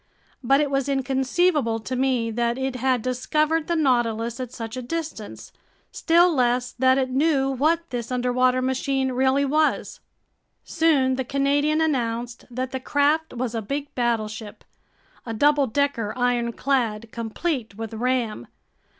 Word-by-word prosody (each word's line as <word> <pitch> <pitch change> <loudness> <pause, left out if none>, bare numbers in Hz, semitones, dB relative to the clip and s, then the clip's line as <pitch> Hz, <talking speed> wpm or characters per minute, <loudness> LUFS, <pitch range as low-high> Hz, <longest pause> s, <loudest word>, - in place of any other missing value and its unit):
But 275 +3 +4
it 295 -2 0
was 275 0 0
inconceivable 270 -1 +1
to 255 +4 -4
me 250 -3 0
that 235 +1 0
it 265 -1 -2
had 255 -2 +1
discovered 305 +5 0
the 340 - 0
Nautilus 235 -5 +1
at 250 -2 -5
such 225 -1 -6
a 255 - -4
distance, 295 -5 -6 0.4
still 345 +1 +3
less 245 -2 +1
that 260 +1 +4
it 260 -1 0
knew 270 0 +2
what 320 +6 +1
this 240 -1 -4
underwater 250 +1 +1
machine 265 0 0
really 265 +2 +2
was. 305 +2 0 0.6
Soon 280 -6 +2
the 260 - -1
Canadian 285 +4 +1
announced 240 -5 -2
that 255 +1 -4
the 260 - -3
craft 290 +3 +1
was 240 -1 -3
a 225 - -2
big 280 +7 -4
battleship, 220 -3 -2 0.6
a 230 -2 -5
double 290 +3 +3
decker 235 -4 -1
ironclad 235 -2 0
complete 230 0 -3
with 225 +1 -6
ram. 235 - -1
255 Hz, 140 wpm, -24 LUFS, 235-280 Hz, 0.6 s, But